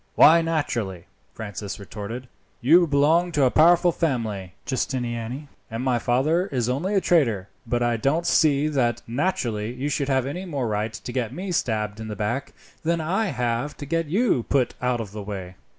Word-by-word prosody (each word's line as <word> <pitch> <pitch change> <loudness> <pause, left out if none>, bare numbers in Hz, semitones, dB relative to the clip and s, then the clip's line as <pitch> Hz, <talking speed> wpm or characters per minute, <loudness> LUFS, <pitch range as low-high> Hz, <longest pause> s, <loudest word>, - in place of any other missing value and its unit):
"Why 165 +2 +7
naturally?" 120 - -2 0.3
Francis 105 -1 -6
retorted. 105 +5 -7 0.3
"You 165 +8 +5
belong 160 +5 +3
to 145 - +3
a 130 - +4
powerful 175 +2 +5
family, 110 - -2
Giustiniani, 125 +1 -3 0.2
and 115 +2 -4
my 125 -2 +1
father 150 - +1
is 125 - -1
only 160 +11 -1
a - - +5
trader, 115 - +2 0.2
but 120 +1 0
I 120 -1 +1
don't 145 +9 +1
see 150 -2 +3
that 120 -5 0
naturally 115 - -1
you 135 +4 -3 0.2
have 130 -2 +1
any 175 +8 -4
more 140 -8 -2
right 105 +1 -1
to 125 - -7
get 120 -3 -2
me 185 +1 -5
stabbed 110 -8 -1
in 110 - -6
the 105 - -5
back, 115 +6 -2 0.3
than 170 +1 0
I 190 +8 0
have 120 -1 -2
to 145 - -6
get 165 +2 -1
you 195 - +2
put 130 -3 +2
out 125 -1 0
of 105 -4 -7
the 105 0 -6
way." 95 -3 -6
125 Hz, 180 wpm, -24 LUFS, 110-155 Hz, 0.3 s, Why